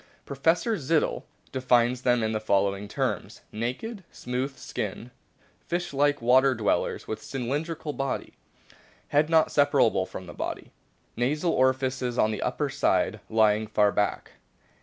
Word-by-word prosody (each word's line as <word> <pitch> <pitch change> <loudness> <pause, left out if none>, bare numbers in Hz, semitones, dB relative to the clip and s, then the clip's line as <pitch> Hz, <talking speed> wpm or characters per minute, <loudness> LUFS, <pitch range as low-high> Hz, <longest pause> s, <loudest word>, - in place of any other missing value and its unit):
Professor 165 - +1
Zittel* 155 +1 0 0.3
defines 125 -1 +2
them 120 -2 +2
in 110 - 0
the 110 - -1
following 100 -1 0
terms: - - -3
"Naked, 130 - -4
smooth 130 +3 -4
skinned, 110 +4 -5 0.6
fish 175 -2 -2
like 145 -1 +2
water 130 +2 +5
dwellers, 110 -3 -1
with 110 - -4
cylindrical 145 +4 -3
body. 135 -1 -3 0.8
Head 150 +2 +2
not 160 -1 +4
separable 140 -9 +3
from 95 - -8
the 85 - -10
body. - - -5 0.4
Nasal 150 +8 0
orifices 130 -2 +1
on 110 - +3
the 110 - -4
upper - - -1
side - - +1
lying 110 -1 +3
far 105 -1 +3
back. 105 0 -1
130 Hz, 135 wpm, -27 LUFS, 110-145 Hz, 0.8 s, water